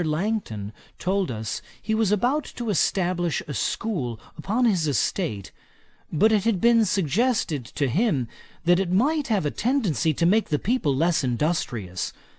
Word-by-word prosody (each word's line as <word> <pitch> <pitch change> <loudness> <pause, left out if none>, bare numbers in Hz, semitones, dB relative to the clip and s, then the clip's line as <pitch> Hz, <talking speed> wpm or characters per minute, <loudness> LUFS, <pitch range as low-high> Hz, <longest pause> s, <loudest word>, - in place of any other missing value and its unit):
Langton 155 - -2 0.2
told 190 0 0
us 110 -2 -4 0.2
he 220 - -2
was 220 -2 +2
about 245 +9 +2
to 235 -3 -4
establish 175 -2 0
a 145 - -4
school 130 - -2 0.2
upon 215 +10 0
his 185 -9 +2
estate, 105 -5 -1 0.6
but 215 +8 +3
it 210 -3 +3
had 230 -5 +1
been 230 0 +4
suggested 190 - 0
to 140 +5 -2
him, 145 - +1 0.4
that 175 +1 +4
it 190 -2 -1
might 285 +10 +2
have 210 - +1
a 145 - 0
tendency 205 - +1
to 160 +3 0
make 210 +5 +3
the 150 - +1
people 185 - 0
less 165 +2 +2
industrious. 120 - -2
180 Hz, 155 wpm, -24 LUFS, 145-220 Hz, 0.6 s, been